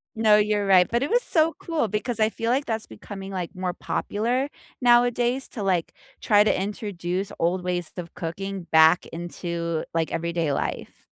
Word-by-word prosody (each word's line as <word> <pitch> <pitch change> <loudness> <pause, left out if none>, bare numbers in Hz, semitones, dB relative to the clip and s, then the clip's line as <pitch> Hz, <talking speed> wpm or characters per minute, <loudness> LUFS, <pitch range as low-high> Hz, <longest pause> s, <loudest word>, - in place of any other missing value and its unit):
No, 220 -1 +5
you're 210 -1 +1
right, 185 -2 +5
but 235 +3 +1
it - - -2
was 485 +1 +3
so 325 -5 +3
cool, 320 -9 -1
because 220 +3 -2
I 215 - +4
feel 230 +1 -3
like 270 +4 +1
that's 225 -1 -3
becoming, 195 - -9
like, 180 -3 -5
more 185 -1 -2
popular 240 +9 -1 0.3
nowadays 245 +1 +3
to, 210 - -5
like, 180 -4 0 0.3
try 205 -1 +4
to 210 - +1
introduce 195 -2 -3
old 180 +2 0
ways 175 -2 -2
of 170 -1 -7
cooking 190 +3 -5
back 160 +2 +6
into, 170 -1 -4
like, 165 -1 0
everyday 170 -2 -1
life. 140 - -4
195 Hz, 170 wpm, -25 LUFS, 175-230 Hz, 0.3 s, back